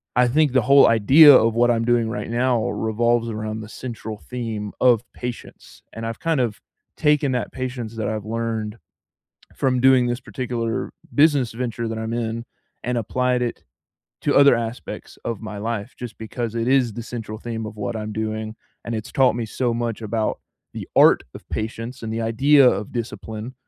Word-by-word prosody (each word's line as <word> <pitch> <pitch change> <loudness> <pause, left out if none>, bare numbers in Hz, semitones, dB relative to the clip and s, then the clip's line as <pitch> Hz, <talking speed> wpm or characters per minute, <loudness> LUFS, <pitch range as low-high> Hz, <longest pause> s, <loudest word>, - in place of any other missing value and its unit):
I 125 +1 +4
think 150 0 +2
the 130 - +4
whole 140 +4 +6
idea 135 +7 +8
of 115 -1 +4
what 120 +1 +3
I'm 115 -1 +2
doing 120 -2 +2
right 105 0 -4
now 120 -1 +1
revolves 115 +1 0
around 110 0 -4
the 105 - -8
central 115 -4 -7
theme 115 -4 -4
of 120 -3 +4
patience, 120 -1 -8
and 115 0 -6
I've 115 0 -5
kind 165 -3 +1
of 120 -4 -1 0.4
taken 150 -3 +2
that 125 - -2
patience 125 -3 -5
that 110 - -2
I've 110 -1 -3
learned 110 -1 -3 0.8
from 130 -1 +1
doing 130 -1 +5
this 120 0 -1
particular 120 -3 -3 0.2
business 145 -5 +4
venture 115 -1 -3
that 110 - -4
I'm 110 +1 -4
in, 115 0 -3 0.4
and 125 0 0
applied 125 +3 0
it 120 - -3 0.6
to - - +1
other 140 -4 +7
aspects 115 +1 -6
of 115 -3 -3
my 105 -2 -7
life, 115 +1 -4
just 120 -2 -8
because 115 +1 -4
it 115 +1 -1
is 130 -4 +3
the 120 - -6
central 115 -3 -6
theme 115 -1 -5
of 105 - -8
what 105 +3 -3
I'm 105 0 -5
doing, 110 0 -4 0.3
and 115 - -4
it's 110 - -7
taught 130 -4 +4
me 115 -2 -3
so 120 +2 -1
much 115 -1 -3
about 110 0 -2 0.3
the - - -6
art - - +6
of - - -12
patience 115 +4 -5
and 110 -1 -4
the 115 - -2
idea 130 +4 +5
of 100 0 -2
discipline 115 0 -5
115 Hz, 185 wpm, -22 LUFS, 110-125 Hz, 0.8 s, idea